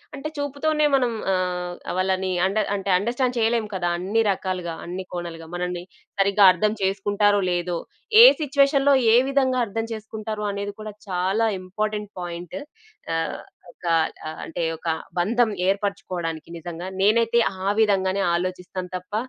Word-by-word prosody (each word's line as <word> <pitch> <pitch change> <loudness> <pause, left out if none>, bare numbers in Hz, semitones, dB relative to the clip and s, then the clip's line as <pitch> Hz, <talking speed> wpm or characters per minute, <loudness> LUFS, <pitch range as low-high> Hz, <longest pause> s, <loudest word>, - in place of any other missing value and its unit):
అంటే 285 +2 -5
చూపుతోనే 295 +2 0
మనం 250 -3 +2 0.2
ఆహ్, 180 -1 -2 0.2
వాళ్ళని 185 0 0
అండ 195 +3 -1 0.2
అంటే 195 -1 -4
అండర్‌స్టాండ్ 245 +5 -1
చేయలేము 225 -1 +1
కదా! 175 -2 0
అన్ని 200 +6 +1
రకాలుగా, 185 -3 -3
అన్ని 180 +2 -5
కోణాలుగా, 170 -2 -6
మనల్ని 180 0 -3 0.4
సరిగ్గా 200 +1 +4
అర్థం 210 +4 +1
చేసుకుంటారో? 205 +1 +2
లేదో? 175 0 -1 0.4
ఏ - - +12 0.2
సిట్యుయేషన్‌లో 280 -1 +3 0.2
ఏ - - +7
విధంగా 260 -2 +2
అర్థం 225 +2 -3
చేసుకుంటారో 215 -1 -5
అనేది 200 0 -4
కూడా 215 -1 -7
చాలా 190 +5 +1
ఇంపార్టెంట్ 210 +2 -3
పాయింట్. 175 -1 -6 0.6
ఆహ్, 165 - -2 0.3
ఒక 175 - -16 0.4
ఆహ్, 160 - -8
అంటే 170 +1 -4
ఒక 165 - -4 0.3
బంధం 230 +6 +2 0.2
ఏర్పరుచుకోవడానికి 185 -5 -2
నిజంగా 175 +2 -6
నేనైతే 230 +3 +4 0.3
ఆ - - +2
విధంగానే 195 -2 +2
ఆలోచిస్తాను 180 0 -4
తప్ప 180 +3 -14
195 Hz, 135 wpm, -23 LUFS, 180-225 Hz, 0.6 s, ఏ